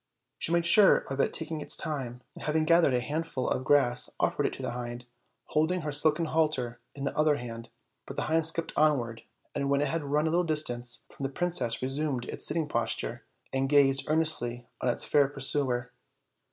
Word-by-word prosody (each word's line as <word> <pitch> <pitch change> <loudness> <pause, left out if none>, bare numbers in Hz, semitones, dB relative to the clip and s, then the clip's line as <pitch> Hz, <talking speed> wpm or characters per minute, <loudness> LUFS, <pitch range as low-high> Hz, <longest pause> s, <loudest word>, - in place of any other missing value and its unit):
She - - +2
made 170 0 +2
sure 195 +4 +7
of 135 0 -6
taking 160 -2 -4
it - - -6
this - - +5
time, 130 -6 -4
and - - -9
having 155 +1 +1
gathered 165 -5 +4
a - - +2
handful 145 0 -3
of 130 - -1
grass, 130 -3 +3
offered - - +1
it - - -5
to - - -8
the - - -2
hind, 120 0 -6 0.4
holding 160 +4 +1
her 150 -1 -3
silken 155 +3 +3
halter 150 -7 -1 0.2
in 140 - -6
the 140 - -3
other 155 -1 +3
hand; 115 -3 -7 0.4
but - - -7
the - - -1
hind 160 +1 +3
skipped 165 0 -1
onward, 125 -7 +1 0.3
and 140 -1 -2
when 140 0 +2
it 145 - 0
had 165 0 -2
run 145 +2 0
a 160 - 0
little 175 +2 +2
distance 125 -7 -1
from - - -14
the 135 - -1
princess 135 -7 -1
resumed 135 -1 -2
its - - +1
sitting 160 -1 0
posture 120 -5 -3 0.3
and 135 0 0
gazed 135 -1 +3
earnestly 125 -7 0 0.2
on 125 - +1
its 120 - -2
fair 145 -2 +3
pursuer. 135 -3 -1
145 Hz, 200 wpm, -28 LUFS, 125-155 Hz, 0.4 s, sure